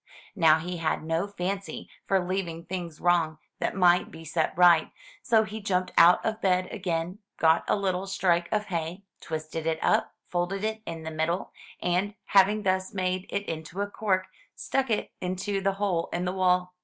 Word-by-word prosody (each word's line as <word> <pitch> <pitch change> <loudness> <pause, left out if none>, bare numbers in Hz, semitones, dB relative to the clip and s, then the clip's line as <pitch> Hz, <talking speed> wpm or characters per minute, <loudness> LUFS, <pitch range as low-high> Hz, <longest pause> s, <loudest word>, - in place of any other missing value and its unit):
Now 160 -5 +5
he 175 +2 -5
had 160 -2 -1
no 165 +4 -1
fancy 195 0 -4 0.2
for 190 -2 +2
leaving 175 -3 -3
things 175 -4 -5
wrong 170 -3 +2 0.2
that - - -1
might 180 -2 +4
be 165 - -11
set 160 0 0
right; 175 -3 +6 0.3
so 225 -2 +4
he 215 +1 -6
jumped 185 -2 0
out 170 +1 +6
of 220 +1 -2
bed 185 -1 +2
again, 180 -2 -3 0.2
got 160 0 +4
a - - +4
little 195 -1 -1
strike 175 -3 +1
of 210 -1 +1
hay, 170 +1 -4 0.2
twisted 160 0 -5
it 160 -1 +1
up, - - +2
folded 180 +3 -2
it 220 0 -2
in 165 -1 -5
the 160 - -5
middle, 160 +3 -1 0.3
and, 185 +4 0
having 200 +2 +4
thus 185 0 0
made 185 0 -1
it 200 0 -2
into 165 +3 -5
a 205 - 0
cork, 190 -4 0 0.3
stuck 270 -2 -1
it 215 - -1
into 190 +2 -2
the 195 0 +1
hole 195 -4 -1
in 175 +1 -2
the 180 - -1
wall. 180 -1 +2
180 Hz, 180 wpm, -27 LUFS, 170-195 Hz, 0.3 s, right